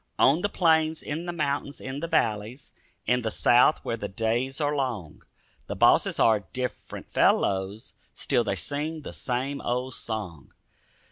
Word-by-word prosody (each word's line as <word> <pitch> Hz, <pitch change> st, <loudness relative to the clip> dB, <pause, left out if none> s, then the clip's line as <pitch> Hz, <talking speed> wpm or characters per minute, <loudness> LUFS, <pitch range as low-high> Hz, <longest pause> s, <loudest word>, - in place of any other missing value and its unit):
On 145 Hz, +6 st, +4 dB
the 205 Hz, -, 0 dB
plains, 160 Hz, -4 st, +2 dB
in 160 Hz, +4 st, -4 dB
the -, -, -1 dB
mountains, 145 Hz, -3 st, -2 dB
in 130 Hz, +1 st, -5 dB
the 170 Hz, -, -3 dB
valleys, 115 Hz, -4 st, -1 dB, 0.3 s
In 125 Hz, +2 st, +2 dB
the 110 Hz, -, -1 dB
south 120 Hz, +6 st, +4 dB
where 115 Hz, -, -2 dB
the 105 Hz, -, -4 dB
days 115 Hz, +7 st, -1 dB
are 145 Hz, -1 st, 0 dB
long, 120 Hz, -, -3 dB, 0.5 s
The -, -, -4 dB
bosses -, -, +4 dB
are 110 Hz, -2 st, +5 dB
different 125 Hz, -1 st, -5 dB
fellows; 95 Hz, +3 st, +1 dB, 0.2 s
Still 125 Hz, -3 st, +1 dB
they 100 Hz, -3 st, -1 dB
sing 150 Hz, -, -4 dB
the -, -, -7 dB
same 135 Hz, +3 st, -3 dB
old 125 Hz, +2 st, -2 dB
song. 100 Hz, -12 st, -6 dB
130 Hz, 155 wpm, -26 LUFS, 110-145 Hz, 0.5 s, are